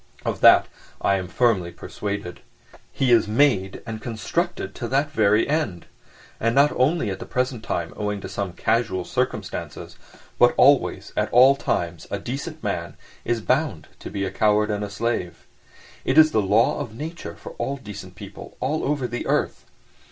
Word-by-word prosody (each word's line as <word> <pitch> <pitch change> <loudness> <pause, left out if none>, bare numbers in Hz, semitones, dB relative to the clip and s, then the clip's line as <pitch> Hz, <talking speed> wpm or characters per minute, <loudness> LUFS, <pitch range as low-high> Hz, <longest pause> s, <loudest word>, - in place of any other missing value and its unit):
Of - - -2
that - - +8 0.3
I 100 - +2
am 90 -1 -4
firmly 95 -3 +1
persuaded. 100 -3 -5 0.5
He 130 -2 +1
is 115 -3 +5
made 105 -5 +2
and 110 -1 -6
constructed 120 - -3
to 120 - -5
that 140 +4 0
very 105 0 +3
end. 130 - -1 0.5
And 115 +2 +1
not 140 +2 +5
only 130 - +1
at 95 - -5
the - - -8
present 125 -2 -2
time 85 -6 -3
owing 105 -1 -2
to - - -6
some 100 -3 -4
casual 110 -4 0
circumstances, - - -4 0.4
but - - +5
always, - - +3
at - - 0
all 130 +3 +7
times, 85 - -2
a 100 - -2
decent 140 - -6
man 85 -5 -3 0.3
is 120 -1 0
bound 125 - 0
to - - -8
be 100 -1 -2
a 95 - -3
coward 105 +1 +2
and 105 0 -2
a 105 - -4
slave. 105 -4 -3 0.6
It 130 - 0
is 155 0 +8
the 110 - +2
law 105 +7 +2
of 120 -7 -6
nature 160 +4 -6
for - - -10
all 140 +1 -2
decent 100 -7 -10
people 100 +2 -11
all 145 +5 -1
over 145 -2 0
the 120 +1 -4
earth. - - -1
110 Hz, 175 wpm, -23 LUFS, 100-135 Hz, 0.6 s, that